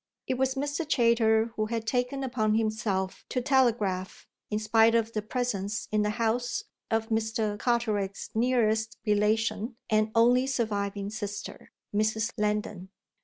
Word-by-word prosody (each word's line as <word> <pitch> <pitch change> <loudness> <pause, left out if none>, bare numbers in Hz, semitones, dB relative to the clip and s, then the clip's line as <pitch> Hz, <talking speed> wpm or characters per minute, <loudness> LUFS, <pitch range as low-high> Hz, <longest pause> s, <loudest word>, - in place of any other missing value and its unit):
It - - -1
was 260 +1 0
Mr. 290 +4 -2
Chayter 230 -5 +3
who 215 0 -1
had 225 0 -3
taken 250 +3 -1
upon 220 -4 +1
himself 215 -4 -1
to 255 - 0
telegraph 230 -8 +1 0.2
in 210 - -1
spite 225 +1 +4
of 230 0 +1
the 215 - -1
presence 210 -3 -2
in 215 0 +2
the 210 - +1
house 235 +1 0 0.3
of 225 -1 0
Mr. 220 -1 0
Carteret's 215 -5 -1
nearest 225 -2 +1
relation 215 +2 +1 0.2
and 215 0 +3
only 245 +3 +4
surviving 205 -5 -2
sister, 205 -2 -6 0.2
Mrs. 220 +2 +1
Lendon. 210 -3 -2
220 Hz, 135 wpm, -28 LUFS, 210-240 Hz, 0.3 s, spite